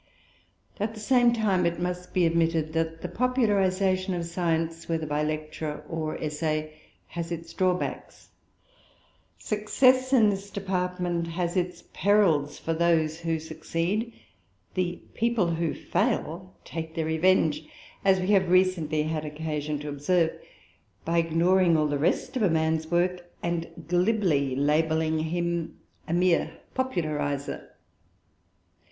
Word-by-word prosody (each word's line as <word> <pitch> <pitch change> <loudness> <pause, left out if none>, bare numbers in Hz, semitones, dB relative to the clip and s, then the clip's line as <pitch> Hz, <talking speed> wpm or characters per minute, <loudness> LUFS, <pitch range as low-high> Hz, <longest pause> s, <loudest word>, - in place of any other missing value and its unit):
At 215 +2 -2
the - - -8
same 240 +2 +4
time 210 -6 +1
it 170 0 -2
must 180 0 -3
be 180 -2 +3
admitted 165 -1 +1
that 165 0 -1
the - - -2
popularization 195 -6 +1
of 170 -1 -3
science, 165 -1 -2
whether 165 -1 -1
by 150 0 -1
lecture 155 0 -3
or 160 -2 -3
essay, 155 0 -2 0.4
has 170 0 -5
its 165 -1 -6
drawbacks. 185 -1 -2 1.1
Success 255 +5 +2
in 225 -6 +5
this 200 0 -5
department 180 -3 -2
has 170 +1 -2
its 180 -1 -2
perils 170 -8 +3
for 165 - -2
those 160 -1 +2
who 165 -1 -1
succeed. 165 +7 -2 0.6
The 180 -1 -2
"people 235 -4 +1
who 165 -1 -1
fail" 185 -5 -2
take 160 -1 -6
their 165 -2 -1
revenge, 160 -1 +2 0.4
as 190 -1 +4
we 185 +1 -2
have 190 -3 +4
recently 180 -5 +2
had 155 0 -2
occasion 150 -1 -3
to 150 - -5
observe, 160 +4 +1 0.7
by 170 +1 +2
ignoring 170 +1 +3
all 155 - +2
the 145 -1 -1
rest 170 - 0
of 255 - 0
a 200 - +4
man's 160 0 +1
work 175 0 0
and 170 -1 -2 0.2
glibly 175 - +2
labelling 160 +2 +1
him 170 +1 -2 0.3
a 165 - -2
more 180 -1 +3 0.2
popularizer. 150 - -2
170 Hz, 130 wpm, -27 LUFS, 160-185 Hz, 1.1 s, in